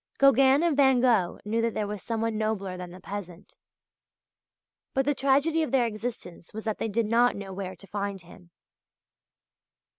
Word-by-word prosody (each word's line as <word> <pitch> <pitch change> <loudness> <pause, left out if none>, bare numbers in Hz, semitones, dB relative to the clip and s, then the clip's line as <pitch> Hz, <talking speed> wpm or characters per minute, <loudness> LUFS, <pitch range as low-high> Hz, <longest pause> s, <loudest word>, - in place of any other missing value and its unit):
Gauguin 275 +2 +5
and 335 -4 +2
Van 265 -2 +5
Gogh 230 -8 +2
knew 225 +2 0
that 230 -1 -1
there 210 - -1
was 205 -1 -5
someone 225 -1 -2
nobler 215 -4 -2
than 180 -1 -7
the 180 +1 -11
peasant. 190 -3 -8 1.4
But 270 0 +2
the 290 - +2
tragedy 280 +4 +2
of 315 - -1
their 260 -3 +3
existence 215 -6 -6
was 220 - -5
that 220 -2 -3
they 225 - -2
did 225 +2 0
not 235 +3 +3
know 195 -1 -7
where 190 -1 -5
to 190 - -14
find 200 0 -4
him. 175 0 -16
220 Hz, 175 wpm, -27 LUFS, 195-260 Hz, 1.4 s, Gauguin